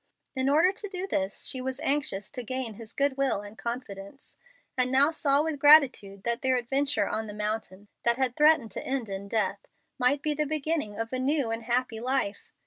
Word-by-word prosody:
In 260 Hz, +1 st, 0 dB
order 320 Hz, +6 st, +4 dB
to 415 Hz, +1 st, -8 dB
do 375 Hz, -1 st, -4 dB
this, 195 Hz, -, -2 dB
she 260 Hz, -, -1 dB
was 260 Hz, +1 st, -4 dB
anxious 240 Hz, -8 st, 0 dB
to 255 Hz, -, -4 dB
gain 250 Hz, -1 st, -4 dB
his 220 Hz, +1 st, -11 dB
good 280 Hz, +1 st, 0 dB
will 270 Hz, -7 st, +1 dB
and 205 Hz, +1 st, -11 dB
confidence, 235 Hz, 0 st, -7 dB, 0.4 s
and 255 Hz, -1 st, +2 dB
now 280 Hz, +4 st, +5 dB
saw 290 Hz, -2 st, +2 dB
with 315 Hz, -3 st, -3 dB
gratitude 270 Hz, -10 st, +5 dB
that 235 Hz, 0 st, 0 dB
their 260 Hz, -1 st, +2 dB
adventure 270 Hz, +4 st, +1 dB
on 220 Hz, 0 st, -3 dB
the 210 Hz, -, -7 dB
mountain, 210 Hz, -2 st, -4 dB
that 235 Hz, 0 st, +3 dB
had 260 Hz, -2 st, 0 dB
threatened 300 Hz, -7 st, +4 dB
to -, -, -4 dB
end 260 Hz, -5 st, -3 dB
in 195 Hz, 0 st, -6 dB
death, 200 Hz, -2 st, -2 dB, 0.3 s
might 260 Hz, +3 st, +2 dB
be 305 Hz, -, +1 dB
the 300 Hz, 0 st, -1 dB
beginning 305 Hz, -7 st, -2 dB
of 225 Hz, +2 st, -4 dB
a 255 Hz, -, -1 dB
new 270 Hz, -2 st, 0 dB
and 225 Hz, 0 st, -3 dB
happy 240 Hz, -1 st, -1 dB
life. 255 Hz, -4 st, -2 dB
255 Hz, 205 wpm, -27 LUFS, 220-285 Hz, 0.4 s, now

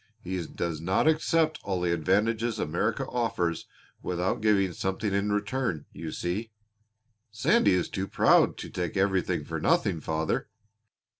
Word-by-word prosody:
He 90 Hz, -3 st, -4 dB
does 80 Hz, -2 st, -4 dB
not 95 Hz, -, +1 dB
accept 155 Hz, 0 st, +2 dB
all 95 Hz, -2 st, -1 dB
the 90 Hz, -1 st, +1 dB
advantages 110 Hz, +7 st, +1 dB
America 85 Hz, -3 st, -1 dB
offers 90 Hz, -9 st, -1 dB, 0.3 s
without 90 Hz, +6 st, -1 dB
giving 100 Hz, -4 st, +3 dB
something 95 Hz, +3 st, -2 dB
in 100 Hz, +1 st, +1 dB
return, 105 Hz, -, -1 dB
you 80 Hz, -2 st, -6 dB
see." 100 Hz, +6 st, -3 dB, 0.8 s
"Sandy 105 Hz, -2 st, +3 dB
is 90 Hz, -1 st, +1 dB
too 95 Hz, 0 st, -3 dB
proud -, -, +4 dB
to -, -, -7 dB
take 90 Hz, 0 st, -3 dB
everything 95 Hz, -1 st, +1 dB
for -, -, -4 dB
nothing, 80 Hz, -, +2 dB
father." 80 Hz, 0 st, -1 dB
95 Hz, 140 wpm, -28 LUFS, 85-110 Hz, 0.8 s, proud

